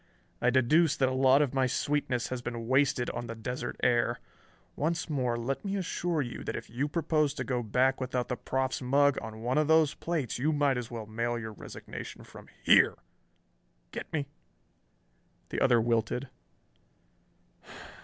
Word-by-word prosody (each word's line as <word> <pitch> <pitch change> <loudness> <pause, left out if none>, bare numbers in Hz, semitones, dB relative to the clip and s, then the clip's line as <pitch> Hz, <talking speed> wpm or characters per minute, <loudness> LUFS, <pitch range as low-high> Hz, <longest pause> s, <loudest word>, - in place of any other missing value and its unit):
I 125 - +4
deduce 140 +6 +4
that 130 -1 +3
a - - -2
lot 135 +2 +5
of 140 - -2
my 135 -1 +2
sweetness 130 -2 -1
has 130 -1 -3
been 120 -2 -5
wasted 130 -1 +2
on 120 - -5
the 115 - -5
desert 120 +2 -4
air. 120 -1 +2 0.6
Once 165 +2 -1
more, 125 -5 0
let 125 +4 -3
me 200 -1 -2
assure 175 -4 -1
you 120 - -7
that - - -4
if - - -7
you 130 +5 -1
propose 155 -2 +1
to - - -3
go 125 -2 -1
back 130 +4 +1
without 125 -1 -1
the 125 - -2
Proff's 130 +1 -2
mug 140 +2 +3
on 110 0 -8
one 125 +5 +1
of 155 - +2
those 160 -2 +4
plates 145 - -3
you 150 +5 +2
might 145 -3 +2
as 120 - -6
well 115 -2 -6
mail 115 +2 -2
your 110 -2 -6
resignation - - -9
from - - -13 0.2
here. - - +6 1.0
Get - - -7
me?" 150 -3 -1 1.2
The - - -3
other 120 -3 +5
wilted. 115 +3 0
130 Hz, 170 wpm, -30 LUFS, 120-145 Hz, 1.2 s, here